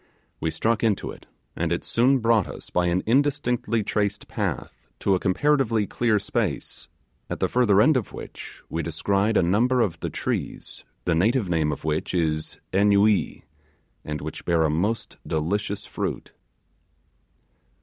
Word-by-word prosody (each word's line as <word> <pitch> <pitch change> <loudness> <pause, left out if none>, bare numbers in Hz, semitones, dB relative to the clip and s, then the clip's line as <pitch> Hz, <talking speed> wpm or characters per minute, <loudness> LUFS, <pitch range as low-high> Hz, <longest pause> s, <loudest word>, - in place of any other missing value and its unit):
We 80 - -1
struck 110 +7 0
into 110 -4 +1
it, - - -14 0.3
and 85 0 -1
it 85 - -1
soon 130 +4 +3
brought 115 -5 +2
us - - -9
by 90 0 +2
an 90 +2 +1
indistinctly 125 -3 +1
traced 105 0 -1
path - - -4
to 100 - +2
a 95 - +2
comparatively 115 +2 +2
clear 115 +1 +1
space, 100 - -3 0.4
at - - -4
the - - +2
further 110 -6 +3
end 140 +8 +5
of 125 -5 -1
which - - -10
we 85 - -2
descried 100 +6 +1
a - - +4
number 115 +9 +2
of 95 -8 0
the - - -3
trees, - - -4 0.2
the 85 - +2
native 105 +5 +2
name 80 -3 +1
of 70 - -6
which 80 +3 -1
is 80 -2 -1
'annuee', 100 +1 +3 0.6
and 75 0 -4
which 80 +1 -6
bear 85 -2 +2
a 80 - +2
most 100 +9 -1
delicious 100 +6 -1
fruit. 100 - -4
100 Hz, 155 wpm, -25 LUFS, 85-115 Hz, 0.6 s, end